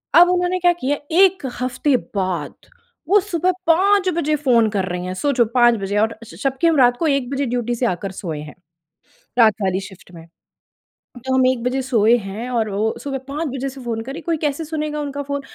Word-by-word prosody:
अब 350 +2 +8
उन्होंने 360 0 0
क्या 350 0 +4
किया, 290 -4 -2
एक 375 -1 +4 0.2
हफ़्ते 255 +3 +1 0.2
बाद 185 -6 -2 0.5
वो 410 +2 +6
सुबह 365 -2 0 0.2
5 380 +3 +4
बजे 305 -2 +1
फ़ोन 245 -7 +3
कर 200 -3 -1
रही 180 0 -4
हैं, 185 - -4
सोचो 250 +2 +2
5 240 -1 +5
बजे! 200 +1 -2
और 220 +1 0
स 230 - -13
जबकि 275 +5 +1
हम 330 - +3
रात 245 -2 +4
को 330 - 0
1 275 -4 0
बजे 275 +1 -1
ड्यूटी 240 -1 -2
से 245 - -1
आकर 190 -2 -2
सोए 165 -5 -5
हैं। 150 0 -10 0.8
रात 220 -2 +6
वाली 190 0 0
शिफ्ट 190 -2 -13
में। 165 -2 -13 1.0
तो 260 - -1
हम 260 -1 +4
1 255 -2 0
बजे 255 +2 0
सोए 235 -3 +3
हैं 215 +3 -6
और 230 -3 0
वो 210 +3 -1
सुबह 275 -1 -3
5 300 +4 -3
बजे 270 +1 -3
से 265 0 -11
फ़ोन 230 -2 -3
कर 265 - -7
रही 315 - -6
हैं, - - -13
कोई 335 -1 0
कैसे 300 +1 -2
सुनेगा 300 -1 -3
उनका 285 0 -4
फ़ोन? 280 0 -3
260 Hz, 215 wpm, -20 LUFS, 220-305 Hz, 1.0 s, अब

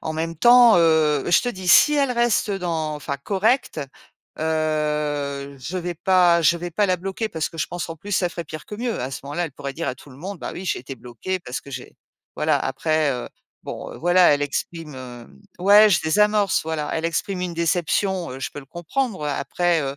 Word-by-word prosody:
en 160 - -4
même 165 +1 -3
temps, 240 +2 +7
heu, 155 -3 +3
je - - +6
te 245 - -1
dis, 185 -5 -6
si 300 - +7
elle 280 -3 +2
reste 235 -3 +1
dans 165 -5 -2
enfin, 145 -1 -4
correcte, 205 - 0 0.6
heu, 150 -3 -1
je 160 +8 -6
vais 175 -1 -3
pas 175 0 +4
je 170 +1 +4
vais 175 +1 -5
pas 205 +5 +1
la 185 -1 +1
bloquer 195 +5 -4
parce 160 -4 -3
que 165 - -12
je - - 0
pense, 175 -1 -5
en 165 - -6
plus, 205 +6 -8
ça 180 -2 +2
ferait 170 - -6
pire 155 -1 -8
que 210 - -7
mieux. 235 0 -2
À 130 +2 -3
ce - - -6
moment-là, 160 +5 -2
elle 160 - -7
pourrait 140 0 -6
dire 165 - -3
à 130 - -2
tout 135 - -17
le 130 - -14
monde: 185 +4 -7
«Bah, - - -5
oui, 185 - -7
j'ai - - -1
été 130 +2 -8
bloquée 130 +10 -5
parce 125 -6 -6
que 140 - -13
j'ai», 125 -1 -8 0.4
voilà. - - +2
Après, 155 -2 0
heu, 125 -2 -4 0.4
bon, - - -6
heu, - - -10
voilà, 175 -1 +5
elle 145 0 +1
exprime, 150 +2 -4
hem 125 -2 -11 0.2
ouais, 205 +3 +7
je 170 - +3
désamorce. 210 +4 +2
Voilà, 155 -2 -3
elle 160 0 -2
exprime 180 +3 -2
une 180 -1 -3
déception. 170 +1 0
Heu, 130 - -7
je - - -3
peux 145 - -7
le - - -14
comprendre, 185 - -3
après, 170 +3 0
heu 135 0 -4
165 Hz, 225 wpm, -22 LUFS, 150-190 Hz, 0.6 s, temps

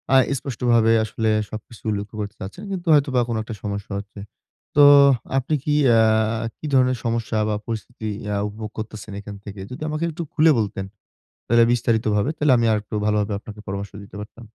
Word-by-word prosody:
আ - - +9 0.2
স্পষ্টভাবে 120 -3 +2
আসলে 110 0 -1 0.2
সবকিছু 110 +1 -10
উল্লেখ্য 105 +1 -4
করতে 105 +1 -6
চাচ্ছেন, 105 - -8
কিন্তু 180 -2 -5
হয়তো 140 -2 +4
বা 125 - +4
কোনো 115 -2 -2
একটা 115 -1 -7
সমস্যা 100 0 -4
হচ্ছে। 100 0 -11 0.6
তো 145 - +6 0.6
আপনি 135 +4 -1
কি 150 - 0 0.2
আ - - +5 0.6
কি - - -9
ধরনের 130 -1 +4
সমস্যা 115 -1 -1
বা 105 - 0
পরিস্থিতি 115 0 -5 0.3
আ - - 0
উপভোগ 105 +1 -7
করতেছেন 110 -1 -7
এখান 100 0 -8
থেকে 100 -1 -8
যদি 125 - -8
আমাকে 155 +2 -2
একটু 170 +2 -5
খুলে 160 +1 +5
বলতেন, 100 -2 -2 0.6
তাহলে 115 +1 +5
বিস্তারিতভাবে, 110 0 +1
তাহলে 150 -2 +3
আমি 115 - +2
আরেকটু 105 0 -2
ভালোভাবে 105 0 +1
আপনাকে 105 0 -11
পরামর্শ 100 +1 -4
দিতে 100 -1 -14
পারতাম। 115 +2 -11
110 Hz, 175 wpm, -22 LUFS, 105-125 Hz, 0.6 s, আ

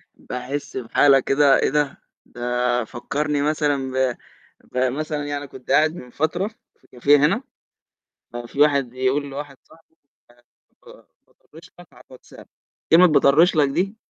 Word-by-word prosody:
باحس 125 +4 -6
بحالة 135 +3 +3
كده 135 +1 +3
إيه - - +1
ده، 150 0 -1 0.2
ده 125 0 -2
فكّرني 145 +5 -3
مثلًا 145 -3 -1
ب 130 -2 0 0.6
بمثلًا 145 +4 -2
يعني 145 0 -5
كنت 130 -1 -10
قاعد 155 +3 +3
من 125 -8 -11
فترة 160 +8 -2 0.3
في - - -29
كافيه 140 +4 +3
هنا 150 - +1 0.9
ففي 120 +3 -7
واحد 140 -3 +3
بيقول 130 +3 -1
لواحد 140 0 -8
صاحبه: 160 0 -24 0.3
"آآ 120 0 -25 0.4
ك - - -17 0.4
باطرِّش 165 +3 -19
لك 175 - -14
على - - -18
الWhatsApp" 130 - -15 0.5
كلمة 175 +3 +8
باطرِّش 155 +3 +4
لك 145 -2 +3
دي، 195 +9 -2
140 Hz, 140 wpm, -21 LUFS, 130-150 Hz, 0.9 s, كلمة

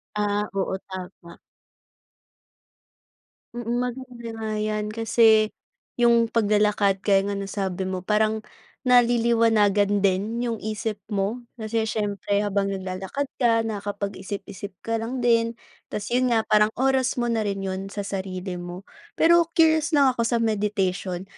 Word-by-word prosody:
Ah, 205 0 0
oo, 190 -1 -1
tama. 180 -2 -9 2.2
Mm, 240 0 -2
maganda 250 -1 -5
nga 220 -1 -4
'yan 215 0 -1
kasi 220 -1 +4 0.5
'yong 235 -1 +4
paglalakad 210 -3 +2
kaya 195 -1 +3
nga - - -2
nasabi 195 -1 -3
mo, 185 -1 -4
parang 215 +1 +1 0.4
naliliwanagan 230 -5 +3
din 205 +5 +1
'yong 230 -2 -2
isip 215 -1 -3
mo. 205 +4 -1 0.2
Kasi 220 0 -2
siyempre 205 -1 -1
habang 200 -1 0
naglalakad 190 +7 -3 0.2
ka 230 -2 +3
nakapag-isip-isip 200 -1 -5
ka 225 0 -1
lang 245 +2 -4
din, 230 -1 +3 0.3
'tas 210 +3 -5
'yon 255 +1 +2
nga 225 -1 +3
parang 215 0 +3
oras 265 0 +1
mo 240 -1 -1
na 225 - +1
rin 195 -1 -3
'yon 190 0 -3
sa 205 +1 -5
sarili 185 -2 -4
mo. 175 +2 -7 0.3
Pero 340 0 +5
curious 315 -1 +4
lang 275 -2 +5
ako 230 -2 -1
sa 235 - +1
meditation 195 -4 -1
215 Hz, 130 wpm, -24 LUFS, 195-235 Hz, 2.2 s, Pero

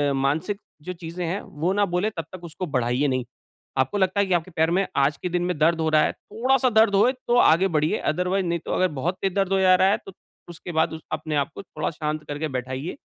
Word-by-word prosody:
मानसिक 150 +9 0 0.2
जो 180 +4 -5
चीज़ें 170 0 -6
हैं, 180 +5 -2
वो 165 +6 -2
ना 205 0 +2
बोले 180 +4 0
तब 165 - -3
तक 180 - -9
उसको 170 +2 -5
बढ़ाइए 130 -1 0
नहीं। 130 -2 -1 0.5
आपको 130 +10 +1
लगता 190 +1 +1
है 200 - +4
कि 185 - +1
आपके 175 +1 0
पैर 160 0 +1
में 190 +2 +2
आज 140 +1 +2
के 180 - -1
दिन 175 0 0
में 180 -4 -1
दर्द 165 +1 +3
हो 160 - +1
रहा 155 -1 +4
है, - - +1
थोड़ा-सा 255 +4 0
दर्द 220 -3 +4
होए 240 +6 +5 0.2
तो 240 - +3
आगे 180 -2 +5
बढ़िए 155 -3 +1
अदरवाइज 180 +3 0
नहीं 170 0 -1
तो - - -4
अगर 185 - +3
बहुत 175 +6 -1
तेज 190 -2 +1
दर्द 195 -1 +1
हो 195 - +3
जा 185 -1 +6
रहा 190 +1 +4
है, 205 - +3
तो 195 - -10 0.4
उसके 175 +1 -8
बाद 160 0 +1
उस 160 - -7
अपने 155 0 -3
आपको 145 +6 -2
थोड़ा 155 -4 -4
शांत 150 -1 -3
करके 145 +2 -3
बैठाइए 130 - -4
170 Hz, 245 wpm, -24 LUFS, 155-190 Hz, 0.5 s, जा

